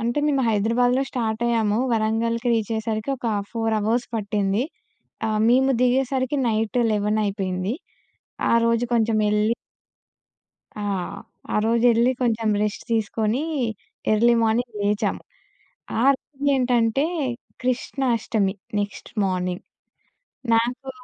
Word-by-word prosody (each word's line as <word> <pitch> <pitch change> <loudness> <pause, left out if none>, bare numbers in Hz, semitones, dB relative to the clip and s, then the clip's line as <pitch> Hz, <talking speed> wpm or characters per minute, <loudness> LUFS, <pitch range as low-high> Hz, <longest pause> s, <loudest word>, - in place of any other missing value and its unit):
అంటే 235 +5 -1
మేము 275 -3 +2
హైదరాబాద్‌లో 240 +5 +2
స్టార్ట్ 225 -2 -2
అయ్యాము. 220 -2 +1
వరంగల్‌కి 230 +2 0
రీచ్ 225 -1 0
అయ్యేసరికి 220 +2 -2
ఒక 240 - -5 0.2
4 225 -1 -1
అవర్స్ 230 +4 0
పట్టింది. 205 +1 0 0.6
ఆహ్, 215 0 0
మేము 265 +2 +4
దిగేసరికి 260 +2 +1
నైట్ 220 +2 0
11:00 210 +1 +1
అయిపోయింది. 190 +1 -2 0.8
ఆ - - +5
రోజు 230 +1 +2
కొంచెం 225 -1 +2
యెళ్లి 210 +2 +2 1.2
ఆ! - - -4 0.7
ఆ - - +3
రోజెళ్ళి 235 +1 +4
కొంచెం 225 -2 +1
రెస్ట్ 210 -1 -2
తీసుకొని, 220 +3 0 0.7
ఎర్లీ 235 +2 +4
మార్నింగ్ 225 0 0
లేచాము. 205 0 0 0.8
ఆ - - +3
రోజు 280 +1 -11
ఏంటంటే 245 +2 +2 0.6
కృష్ణాష్టమి 240 -5 0 0.3
నెక్స్ట్ 205 0 -5
మార్నింగ్. 180 -1 -2 0.9
నాకు 245 +4 -1
225 Hz, 110 wpm, -23 LUFS, 215-245 Hz, 1.2 s, ఆ